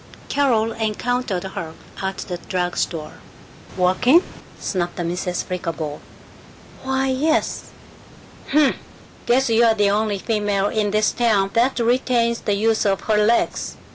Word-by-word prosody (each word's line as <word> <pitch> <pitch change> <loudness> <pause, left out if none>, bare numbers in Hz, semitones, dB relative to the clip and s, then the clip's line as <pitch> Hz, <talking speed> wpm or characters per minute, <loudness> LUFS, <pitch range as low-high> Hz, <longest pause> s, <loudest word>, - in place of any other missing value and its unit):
Carol 235 -6 +2
encountered 225 -2 -2
her 170 -4 -6 0.3
at 190 0 -3
the 180 - -5
drug 180 -2 -1
store. 155 -3 -3 0.6
"Walking?" 245 - +4 0.4
snapped 175 -3 -2
Mrs. 175 +1 -2
Flickerbaugh. 165 -4 -4 0.8
"Why, 265 0 0
yes." 300 +5 0 0.8
"Humph. 295 -1 +3 0.5
Guess 250 +1 +3
you're 225 0 +4
the 205 -2 +3
only 210 0 0
female 205 -1 0
in 215 -2 0
this 215 +1 +2
town 210 -5 +1
that 245 +3 +2
retains 235 -1 +1
the 205 - -1
use 220 +2 +1
of 195 -2 +1
her 210 -1 +2
legs. 230 +2 0
215 Hz, 125 wpm, -21 LUFS, 190-240 Hz, 0.8 s, Walking